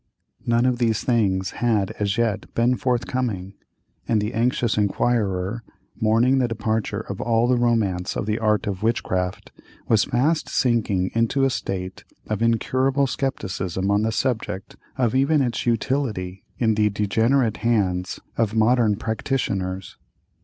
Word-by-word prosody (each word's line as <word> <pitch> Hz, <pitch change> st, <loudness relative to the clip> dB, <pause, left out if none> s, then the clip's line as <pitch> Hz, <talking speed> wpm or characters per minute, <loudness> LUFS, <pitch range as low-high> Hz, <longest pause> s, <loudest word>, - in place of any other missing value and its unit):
None 120 Hz, +1 st, +3 dB
of 125 Hz, -1 st, +1 dB
these 115 Hz, -3 st, +1 dB
things 95 Hz, -6 st, +1 dB
had 110 Hz, -5 st, 0 dB
as 100 Hz, 0 st, 0 dB
yet 110 Hz, -3 st, -1 dB
been 120 Hz, +2 st, +3 dB
forthcoming, 120 Hz, -7 st, -2 dB, 0.5 s
and 110 Hz, -, +2 dB
the 105 Hz, +2 st, -2 dB
anxious 120 Hz, -1 st, +1 dB
inquirer, 105 Hz, -1 st, 0 dB, 0.3 s
mourning 115 Hz, +5 st, +3 dB
the 125 Hz, -, +2 dB
departure 110 Hz, -1 st, -2 dB
of 100 Hz, -2 st, -6 dB
all 115 Hz, 0 st, +2 dB
the 125 Hz, -, +3 dB
romance 110 Hz, -7 st, 0 dB
of -, -, -2 dB
the 105 Hz, +1 st, -1 dB
art 110 Hz, -1 st, +1 dB
of 100 Hz, -3 st, -3 dB
witchcraft, 95 Hz, -5 st, -1 dB, 0.4 s
was 110 Hz, -3 st, +3 dB
fast 150 Hz, +7 st, +1 dB
sinking 105 Hz, -7 st, +1 dB
into 115 Hz, +4 st, +1 dB
a 135 Hz, -, +3 dB
state 95 Hz, -6 st, -4 dB, 0.2 s
of 110 Hz, -1 st, -3 dB
incurable 130 Hz, +4 st, +2 dB
scepticism 95 Hz, -8 st, -2 dB
on 100 Hz, +1 st, +3 dB
the 110 Hz, +1 st, 0 dB
subject 110 Hz, -5 st, -2 dB, 0.2 s
of 120 Hz, -4 st, +1 dB
even 140 Hz, +4 st, +3 dB
its 125 Hz, -3 st, -1 dB
utility, 115 Hz, -6 st, -1 dB
in 110 Hz, -2 st, +2 dB
the 105 Hz, 0 st, +2 dB
degenerate 110 Hz, +4 st, +1 dB
hands 95 Hz, -6 st, 0 dB, 0.2 s
of 115 Hz, -1 st, 0 dB
modern 110 Hz, -1 st, +3 dB
practitioners. 100 Hz, -5 st, -3 dB
110 Hz, 140 wpm, -23 LUFS, 100-120 Hz, 0.5 s, None